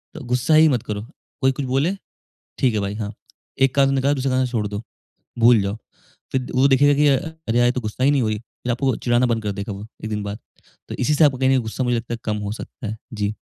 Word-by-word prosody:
तो 155 - -7
गुस्सा 125 +5 +1
ही 160 +1 +7
मत 125 -5 0
करो। 105 -1 -4 0.4
कोई 130 - +4
कुछ 135 +1 -4
बोले 140 +9 +1 0.6
ठीक 125 -4 +2
है 105 - +1
भाई 100 +1 -3
हाँ, 105 -1 -4 0.5
एक 135 -1 +3
कान 140 -1 +4
से 135 - +1
निकाला 135 +2 +2
दूसरे 135 -1 -1
कान 130 0 +2
से - - -7
छोड़ 110 -4 0
दो, 105 +2 -5 0.6
भूल 115 -1 +6
जाओ। 100 +2 -2 0.6
फिर 130 -1 -1
वो 135 +2 +4
देखेगा 145 +2 +5
कि 150 +1 +3
अ, 135 - +5 0.3
"अरे! 120 +2 +2
यार 120 - +5
ये 120 - +3
तो 125 - -2
गुस्सा 110 +4 -3
ही 140 - +5
नहीं 140 -3 +2
हुई।" 110 -1 0
फिर 120 +2 -8
आपको 130 +3 -2
वो 130 - +2
चिढ़ाना 120 +1 +2
बंद 115 -2 0
कर 105 - -2
देगा 100 +1 -5
वो 100 +2 -8 0.2
1 110 - -4
दिन 105 -1 -2
बाद। 100 +1 -5 0.5
तो - - -5
इसी 145 +4 +2
से 155 - +5
आपका 135 -3 +3
कहीं 130 0 +2
न - - +4
कहीं 130 -2 +3
गुस्सा 110 +3 -3
मुझे 120 -1 +1
लगता 115 +1 -4
है 115 - -6
कम 105 -1 -1
हो 100 - -2
सकता 115 +2 -8
है। 110 - -4 0.2
जी। 105 0 -1
125 Hz, 280 wpm, -22 LUFS, 110-135 Hz, 0.6 s, ही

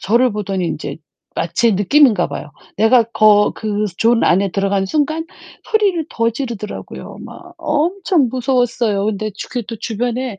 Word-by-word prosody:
저를 235 +3 +2
보더니 195 -3 -2
인제 145 -3 -4 0.4
마치 190 +7 +1
느끼는가 220 +5 +3
봐요. - - -7 0.3
내가 230 +3 +5
거 215 -2 +4
그 210 -1 -2
존 230 +1 +3
안에 195 +2 +3
들어가는 195 -1 0
순간 310 +6 -1 0.4
소리를 395 -8 +1
더 230 0 +1
지르더라고요. 235 -4 -7
막 355 -1 -12
엄청 325 -1 +1
무서웠어요. 245 -5 0
근데 215 0 -2
주 - - -7
그 245 -2 -2
또 230 - -6
주변에 240 0 -3
230 Hz, 310 characters per minute, -18 LUFS, 205-270 Hz, 0.4 s, 내가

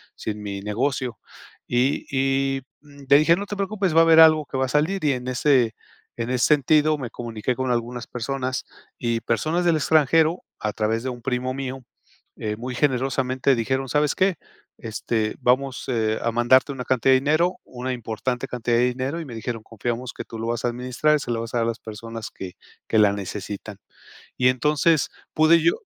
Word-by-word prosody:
sin 105 -1 -5
mi 100 -1 -5
negocio". 120 +3 -2 0.5
Y 125 +3 +1
y, 135 0 +1 0.2
mm, 145 -1 -15
le 140 - +8
dije: 155 +3 +5
"No 200 +3 -5
te 205 - -4
preocupes, 195 -3 -1
va 165 - +8
a - - +7
haber 165 -1 +6
algo 155 -1 +6
que 135 - -5
va 130 - +2
a - - -4
salir", 185 +5 0
y 145 - +3
en 125 -1 -5
ese 130 -2 +2 0.4
en 115 0 -3
ese 125 0 +2
sentido, 150 +1 +3
me 125 -3 -5
comuniqué 115 +1 -3
con 130 0 -1
algunas 120 0 -2
personas 130 +1 -3 0.3
y 115 -1 -1
personas 155 +9 0
del 170 -2 +4
extranjero, 160 +3 +3 0.2
a 105 -1 -2
través 110 +1 0
de 130 - -2
un 120 -1 -7
primo 130 0 -1
mío, 135 -1 -5 0.5
eh, 105 -1 -3
muy 125 +2 -5
generosamente 130 0 +1
dijeron: 130 +3 -1
"¿Sabes 150 +2 +2
qué?, 190 -1 +2 0.4
este, 110 0 -2
vamos, 130 +1 +1
eh, 110 -3 0
a 115 - +1
mandarte 120 +4 +4
una 130 -2 -5
cantidad 130 +1 +3
de 130 - +5
dinero, 155 +6 +2
una 130 +1 -5
importante 125 +2 -3
cantidad 120 -2 0
de 120 - +4
dinero" 130 +6 -3
y - - -7
me 125 -5 -8
dijeron: 115 0 -5
"Confiamos 120 +3 -4
que - - -6
tú 115 - -9
lo 115 - -3
vas 120 0 -2
a - - +2
administrar 125 +5 +1
y - - -6
se 125 - -4
lo 115 -1 -1
vas 115 - -7
a - - 0
dar 115 - +1
a - - 0
las 115 - -18
personas 115 +1 -7
que 90 -2 -8 0.3
que 110 - +1
la 105 -1 +5
necesitan". 100 +1 -6 0.6
Y 125 - +4
entonces 150 +4 +2 0.2
pude 155 +2 +6
yo 165 - +4
130 Hz, 200 wpm, -23 LUFS, 115-145 Hz, 0.6 s, le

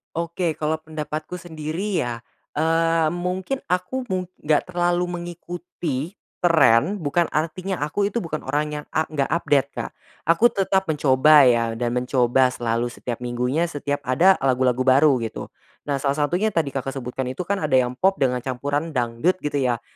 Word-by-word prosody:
Oke, 170 0 -1
kalau 155 +1 -1
pendapatku 155 +2 -6
sendiri 170 +4 -3
ya, 120 -1 -2 0.3
eee, 165 0 +2
mungkin 180 +8 -2
aku 185 +9 -2
mung 185 -4 -3 0.2
enggak 150 +3 +2
terlalu 175 0 0
mengikuti 175 -3 -5 0.2
tren 165 - +4
bukan 165 +3 +1
artinya 170 +3 -2
aku 180 +7 0
itu 235 - -1
bukan 155 -3 -5
orang 145 +3 0
yang 150 -1 -5
a 155 - 0
enggak 145 -3 0
update 145 -5 +2
Kak, - - -4 0.4
aku 220 +9 +5
tetap 190 0 +1
mencoba 145 -2 +5
ya 115 -1 +1
dan 120 +1 -2
mencoba 125 0 +2
selalu 120 0 -2
setiap 120 -2 -5
minggunya 125 +7 0
setiap 145 -3 -4
ada 175 +10 +4
lagu-lagu 130 -1 +1
baru 135 +1 +5
gitu. 115 -2 -5 0.4
Nah, 140 - +1
salah 140 0 0 0.2
satunya 205 +6 0
tadi 160 -5 +1
Kakak 135 0 -4
sebutkan 130 0 -4
itu 140 - -5
kan 200 +3 -1
ada 155 -6 -2
yang 125 -1 +2
pop 190 +6 +3
dengan 125 -1 +2
campuran 145 +5 -3
dangdut 125 +9 0
gitu 150 -1 -2
ya, 125 -4 0
150 Hz, 160 wpm, -23 LUFS, 130-175 Hz, 0.4 s, aku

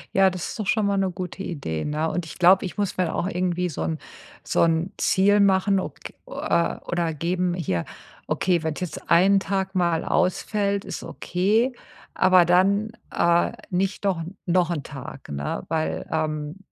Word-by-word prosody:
Ja, 195 0 +6
das 180 -2 -5
ist - - -7
doch 210 - -3
schon 215 0 +2
mal 200 0 +1
'ne 190 -1 +1
gute 180 +1 -6
Idee, 140 - -4
ne? 150 +2 -1
Und 175 -2 -2
ich - - -9
glaube, 185 +2 +5
ich 185 - -7
muss 205 -3 -1
mir 185 - +2
dann 160 - -3
auch 180 - -1
irgendwie 180 -1 -1
so 160 - -5
'n 160 -1 -1 0.5
so' - - +2
n 165 +2 +1
Ziel 205 +2 +3
machen 195 0 +3
ob - - -6
g - - -9
äh, 170 0 0
oder 170 -2 -1
geben, 175 +3 0
hier, 95 - -1 0.4
okay, 180 -3 +1
wenn's 160 -2 -3
jetzt 180 -4 -6
1 190 +4 +5
Tag 190 0 -2
mal 170 -3 +1
ausfällt, 200 +2 0
ist - - -5
okay, 215 +8 0 0.4
aber 185 -1 +5
dann, 195 +5 +3 0.2
äh, 170 +3 +2 0.2
nicht 195 +3 -1
doch 185 -4 +1 0.2
noch 180 -1 +2
'n 160 -5 -2
Tag, 135 -1 -9
ne? 70 0 -3
Weil, 160 -1 -2
ähm, 155 0 -2
180 Hz, 185 wpm, -24 LUFS, 165-195 Hz, 0.5 s, Ja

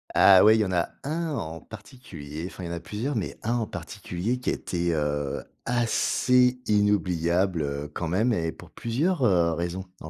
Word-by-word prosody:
Ah 95 -2 +8
ouais, 110 +1 +7
il - - +2
y - - +2
en 95 - -3
a 85 -2 +1
un 160 +3 -2
en 80 - -4
particulier, 90 - -9
enfin, 95 - -9
il - - -4
y - - -6
en - - -4
a - - -4
plusieurs, 115 - -4
mais 105 - -3
un 115 - 0
en 115 - -2
particulier 105 +9 -4
qui 125 - -2
a - - +1
été 85 -1 -2
heu, 75 -2 -2 0.2
assez 125 +1 +2
inoubliable 95 -4 +1
heu, 70 +1 -4
quand 85 - -3
même 110 +8 +2
et 80 -4 -1
pour - - -14
plusieurs 145 +9 -1
heu, 85 -7 +3
raisons 85 +3 -3 0.2
en 80 - -8
95 Hz, 200 wpm, -26 LUFS, 85-120 Hz, 0.2 s, Ah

